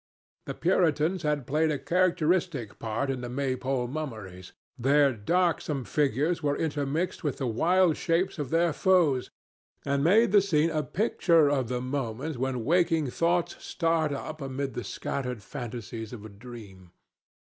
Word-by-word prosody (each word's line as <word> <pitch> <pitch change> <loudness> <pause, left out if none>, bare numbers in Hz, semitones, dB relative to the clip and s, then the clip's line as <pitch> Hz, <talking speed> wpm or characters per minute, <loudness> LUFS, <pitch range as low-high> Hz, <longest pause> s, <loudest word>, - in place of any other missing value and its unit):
The - - -4
Puritans 160 +1 +1
had 150 -3 -1
played 155 +4 +1
a 150 - 0
characteristic 170 - 0
part 115 +5 -2
in 130 -2 -4
the 120 - -5
Maypole 130 -1 -1
mummeries. 110 - -7 0.2
Their 140 +2 +3
darksome 150 - 0
figures 150 +4 0
were 145 -1 0
intermixed 155 +4 -2
with 145 -5 -2
the 135 - -2
wild 170 +8 +2
shapes 175 +1 0
of 145 -4 -3
their 165 +1 +2
foes, 165 -10 +2 0.6
and 140 0 0
made 210 +6 +4
the 205 -1 +6
scene 165 -4 +2
a 155 - 0
picture 165 -5 +2
of 135 -4 0
the 125 +1 -2
moment 130 +2 -3
when 125 -2 -2
waking 165 -4 +2
thoughts 170 +3 0
start 165 -3 0
up 155 +2 -5
amid 135 0 -3
the 120 - -4
scattered 125 +2 -4
fantasies 115 -2 -7
of 110 -3 -9
a - - -8
dream. 100 -4 -12
145 Hz, 150 wpm, -28 LUFS, 125-165 Hz, 0.6 s, the